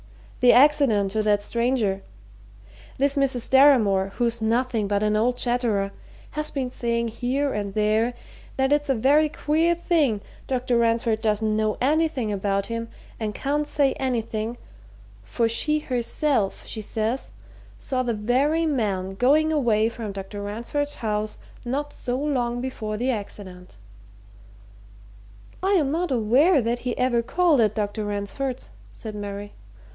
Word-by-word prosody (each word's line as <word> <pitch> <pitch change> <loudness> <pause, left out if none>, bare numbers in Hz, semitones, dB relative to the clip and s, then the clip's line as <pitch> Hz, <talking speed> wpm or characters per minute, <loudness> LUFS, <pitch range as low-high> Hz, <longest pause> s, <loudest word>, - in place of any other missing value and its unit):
"The 250 -1 +6
accident 260 -8 +4
to 215 +1 0
that 205 -1 +2
stranger. 235 -4 0 1.0
This 280 +1 +2
Mrs. 265 -4 0
Deramore, 230 -9 +5
who's 235 -1 -1
nothing 230 -1 0
but 205 +1 0
an 210 0 +2
old 245 +3 +1
chatterer, 235 -5 0 0.4
has 305 0 -3
been 260 -3 -3
saying, 235 -1 -1
here 260 +5 -1
and 200 -2 -4
there, 215 +3 +2 0.4
that 265 +1 +2
it's 295 -1 0
a 270 - +3
very 290 +6 +3
queer 320 +3 +1
thing 305 - +1 0.3
Dr. 250 -2 0
Ransford 230 -1 +1
doesn't 215 -1 +1
know 215 -1 0
anything 285 -4 +1
about 200 0 -1
him, 230 0 -4 0.3
and 215 -2 -3
can't 295 +2 -1
say 280 -3 +2
anything, 230 -3 -2 0.6
for 225 - 0
she 300 +7 +1
herself, 255 -4 -1
she 220 - -5
says, 220 +4 -2 0.5
saw 255 -1 -2
the 240 -3 -1
very 270 +10 +1
man 200 -10 -1
going 300 +9 +3
away 225 -7 +2
from 225 -2 -6
Dr. 195 +1 -7
Ransford's 235 +8 -3
house 215 -1 -3 0.3
not 285 +4 -3
so 245 0 -3
long 250 -4 -1
before 220 -4 -4
the 250 +4 0
accident." 185 - -7 1.8
"I 385 +2 +1
am 300 -8 +2
not 340 +3 -1
aware 265 - +4
that 240 0 -1
he 250 0 -3
ever 250 -2 +2
called 320 +2 +2
at 215 -1 +2
Dr. 210 0 -2
Ransford's," 205 +6 -4 0.2
said 220 -2 -8
Mary. 205 0 -6
235 Hz, 140 wpm, -24 LUFS, 215-275 Hz, 1.8 s, The